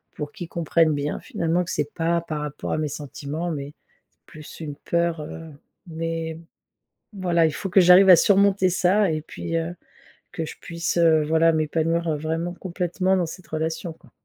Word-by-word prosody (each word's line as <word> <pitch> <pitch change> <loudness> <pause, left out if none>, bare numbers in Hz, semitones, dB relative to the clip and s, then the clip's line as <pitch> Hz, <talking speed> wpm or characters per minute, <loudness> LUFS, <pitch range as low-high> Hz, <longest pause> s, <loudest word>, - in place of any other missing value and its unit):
pour 150 - -5
qu'il 185 -6 -7
comprenne 165 -1 +2
bien 145 0 -2
finalement, 170 +2 -1
que - - -5
c'est 150 -1 -2
pas 170 +1 +1
par 155 -3 -5
rapport 150 -1 -5
à - - 0
mes 155 - -1
sentiments, 150 +3 -5
mais 145 -1 -5 0.5
plus 155 -2 -12
une 150 -2 -5
peur, 170 +1 -1
heu. 160 +2 -8 0.4
Mais 165 0 -4 0.7
voilà, 175 -4 +2
il - - -1
faut 195 - -4
que 190 +2 +5
j'arrive 180 +2 +7
à 180 - +11
surmonter 200 +1 +4
ça 185 +2 +2
et 155 0 -2
puis, 165 +2 -4
heu, 165 +1 -3 0.6
que 170 -4 -3
je - - -9
puisse, 170 0 -3
heu, 160 -2 +5
voilà 160 +2 +3
m'épanouir, 160 +1 0
vraiment 160 +3 -2
complètement, 185 +1 -1
dans 180 -2 0
cette 175 +2 -10
relation 160 +2 -3
quoi. - - -22
165 Hz, 175 wpm, -24 LUFS, 155-175 Hz, 0.7 s, à